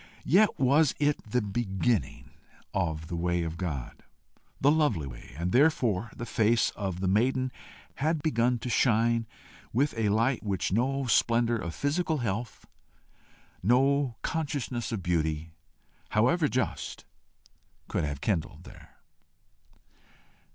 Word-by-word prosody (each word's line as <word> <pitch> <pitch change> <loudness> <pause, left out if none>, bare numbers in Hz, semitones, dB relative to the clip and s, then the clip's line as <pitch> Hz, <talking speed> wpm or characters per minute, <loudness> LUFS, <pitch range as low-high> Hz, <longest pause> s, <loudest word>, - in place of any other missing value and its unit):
yet 200 +8 +4
was 140 +3 +4
it 145 0 +1
the 125 +1 +1
beginning 105 +1 -1 0.4
of 80 -5 -1
the 85 - -5
way 85 0 0
of 80 0 -4
God, 75 -9 -5 0.6
the 140 - +4
lovely 145 - +2
way, - - -10
and 85 +2 -2
therefore 120 - +2
the 120 - -5
face 115 -1 +2
of 95 -3 -4
the 95 - 0
maiden 130 +6 +2 0.5
had 155 +1 0
begun 125 -5 +2
to 120 - -7
shine 115 -1 +2 0.4
with 135 +5 +1
a 110 -2 +1
light 115 +5 +2
which 100 -4 -2
no 135 +6 +1
splendour 120 0 +2
of 85 -6 -5
physical 160 +3 0
health, 115 -1 -4 1.0
no 135 +4 +2
consciousness 135 -7 -2
of 105 -5 -3
beauty, 80 -2 -1 0.6
however 130 +10 +3
just, 130 -2 -3 0.8
could - - -1
have 70 -2 -3
kindled 90 -8 -2
there. - - -15
115 Hz, 125 wpm, -28 LUFS, 95-135 Hz, 1.0 s, yet